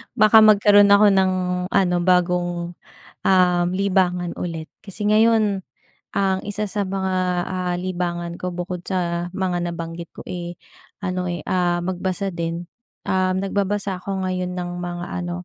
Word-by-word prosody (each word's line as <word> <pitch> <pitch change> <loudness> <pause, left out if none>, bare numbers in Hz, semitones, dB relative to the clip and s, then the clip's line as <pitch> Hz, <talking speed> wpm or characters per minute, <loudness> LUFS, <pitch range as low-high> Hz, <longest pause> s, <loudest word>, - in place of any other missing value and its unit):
baka 215 -1 +7
magkaroon 205 -1 +6
ako 200 +1 +6
ng 190 -1 +3 0.4
ano 180 -1 +2
bagong, 175 -1 +1 0.5
um, 180 -2 +3
libangan 185 -2 0
ulit. 165 -3 -5 0.2
Kasi 205 +1 -5
ngayon, 215 -2 +3 0.5
ang 190 -1 +1
isa 205 +1 -1
sa 205 -1 -2
mga, 190 -1 -2 0.3
ah, 180 -1 -2
libangan 175 -1 -3
ko 180 - -2
bukod 180 0 -5
sa 175 -2 -1
mga 180 -2 -1
nabanggit 170 0 -6
ko, - - -9
eh, 175 -1 -6 0.5
ano, 180 -1 -2
eh, 175 -1 -4
ah, 175 -1 0
magbasa 185 +2 -2
din, 170 0 -3 0.4
um, 185 0 +1
nagbabasa 195 0 -1
ako 195 -1 -3
ngayon 185 -1 -2
ng 175 -1 -4
mga 175 0 -5
ano, 175 0 -4
185 Hz, 140 wpm, -22 LUFS, 175-195 Hz, 0.5 s, baka